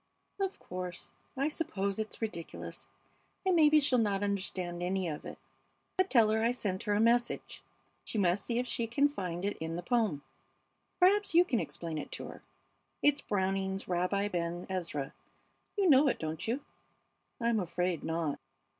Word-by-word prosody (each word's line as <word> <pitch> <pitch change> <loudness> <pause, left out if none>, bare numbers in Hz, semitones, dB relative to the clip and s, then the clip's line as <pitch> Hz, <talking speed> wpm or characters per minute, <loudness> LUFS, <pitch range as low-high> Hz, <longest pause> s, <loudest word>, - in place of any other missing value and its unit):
"Of 390 -1 -1
course, 180 -1 -6 0.3
I 275 +2 +2
suppose 210 - -2
it 215 0 -2
is - - -8
ridiculous! 170 -7 -5 0.6
And 375 -1 +4
maybe 305 -2 +7
she'll 270 -4 +3
not 205 -3 +1
understand 185 -3 -2
any 185 +1 0
of 150 -2 -5
it; - - -7 0.6
but 375 0 +2
tell 225 -4 +5
her 220 0 +2
I 230 +2 +3
sent 195 -6 -2
her 205 -1 +2
a - - +2
message. 235 +2 +1 0.4
She - - -5
must 185 -1 +2
see 235 - -1
if 250 - +1
she 235 -2 -2
can 280 +5 +3
find 185 -9 -4
it 205 - -1
in 160 +1 -3
the 175 - -4
poem. 205 -10 +1 0.8
Perhaps 390 0 +4
you 350 +1 +8
can 240 -8 +1
explain 165 -2 -4
it - - -7
to - - -5
her. - - -10 0.6
It's 290 -1 +4
Browning's 195 0 -1
'Rabbi 180 +3 +1
Ben 175 -1 -2
Ezra.' 165 -7 -3 0.6
You 395 -2 +3
know 285 -2 +7
it, 260 - +2
don't 160 +3 -4
you?" 245 +5 0 0.8
"I'm 235 -2 +2
afraid 175 -2 -1
not. 160 -3 -1
200 Hz, 170 wpm, -32 LUFS, 175-245 Hz, 0.8 s, you